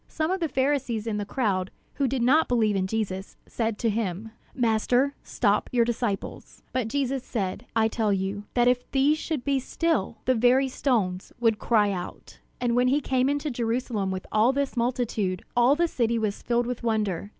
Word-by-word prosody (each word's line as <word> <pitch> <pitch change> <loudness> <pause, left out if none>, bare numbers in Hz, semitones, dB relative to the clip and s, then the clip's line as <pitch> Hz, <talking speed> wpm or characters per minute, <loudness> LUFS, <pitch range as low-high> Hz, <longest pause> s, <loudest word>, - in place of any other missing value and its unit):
Some 315 +2 -2
of 380 - 0
the 330 -3 -1
Pharisees 260 -5 0
in 220 -2 -2
the 205 -1 -3
crowd, 195 -6 0 0.2
who 275 - 0
did 255 -1 -1
not 295 +6 +4
believe 220 -4 +2
in 190 -1 0
Jesus, 195 -2 -3
said 225 -2 -2
to 230 - 0
him: 210 0 -3 0.2
"Master, 245 +3 +2
stop 210 -3 0
your 240 -2 +3
disciples!" 235 -4 -4
But 255 -3 0
Jesus 270 +1 -1
said: 195 -6 -3
"I 220 -1 +4
tell 220 -1 0
you, 195 +1 -2
that 240 0 +4
if 250 0 +1
these 285 +3 +2
should 310 -7 -3
be 280 -1 +2
still, 270 - -1
the 255 - +4
very 255 +3 +3
stones 205 -9 -1
would 225 -3 +2
cry 210 -3 +2
out!" 180 -2 -7 0.2
And 240 -1 0
when 250 +1 +3
he 275 +3 +3
came 260 -1 +1
into 290 +1 -1
Jerusalem 230 -4 -1
with 190 -1 -4
all 215 +4 +4
this 275 0 -2
multitude, 235 -6 -1
all 245 +3 +5
the 345 +2 +2
city 235 -6 0
was 215 -2 -2
filled 240 0 +1
with 245 0 -4
wonder. 210 -5 -1
235 Hz, 190 wpm, -26 LUFS, 210-260 Hz, 0.2 s, all